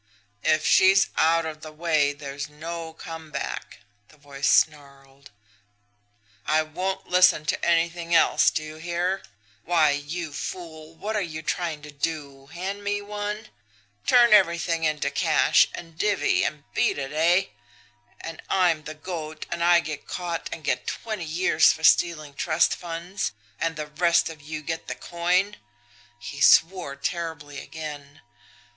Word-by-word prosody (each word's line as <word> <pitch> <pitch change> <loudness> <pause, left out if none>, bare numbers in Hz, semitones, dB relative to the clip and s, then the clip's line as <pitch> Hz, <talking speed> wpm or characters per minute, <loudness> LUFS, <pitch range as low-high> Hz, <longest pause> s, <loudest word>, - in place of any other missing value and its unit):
"'If 155 0 +2
she's 195 +1 +5
out 165 +1 +3
of 155 -1 -6
the 155 - -9
way, 155 -2 +1
there's 145 0 -7
no 165 +2 -6
come 160 -1 -9
back,' 145 -2 -5 0.3
the 155 - -21
voice 140 -1 -4
snarled. 140 -2 0 1.2
'I 155 +1 +3
won't 185 +5 -4
listen 180 -4 +4
to 135 - -1
anything 170 0 +1
else! - - +5
Do 155 - -3
you 155 0 -9
hear! 175 +3 -2 0.4
Why, 165 -4 +3
you 145 +2 -4
fool, 160 0 -7
what 215 +6 -4
are 210 - +1
you 160 -4 -5
trying 165 -4 -2
to 150 - -9
do 140 -2 -4
hand 190 +6 -5
me 205 0 -1
one! 210 +1 -5 0.6
Turn 240 -2 +6
everything 170 -4 +3
into 150 -2 0
cash, - - +4
and 165 -2 -10
divvy, 210 -2 +2
and 150 -1 -3
beat - - +1
it 135 -1 -4
eh? 170 +5 +3 0.7
And 165 -1 -7
I'm 175 -5 +2
the 155 0 -7
goat, 155 -1 -6
and 170 - -2
I 175 0 +5
get 155 -3 -7
caught 170 -2 -4
and 160 - -7
get 125 -3 -1
twenty 215 -6 -4
years 160 0 +4
for 160 - -7
stealing 155 -3 +3
trust 155 +3 +2
funds 170 - -4 0.3
and 165 -1 -1
the 150 0 -4
rest 170 +3 +2
of 155 -2 -13
you 155 +1 -6
get 160 +2 -4
the 125 - -4
coin!' 180 +8 0 0.6
He 140 +4 -8
swore 165 -1 +4
terribly 150 -2 -4
again. 145 -3 -8
160 Hz, 150 wpm, -25 LUFS, 150-175 Hz, 1.2 s, Turn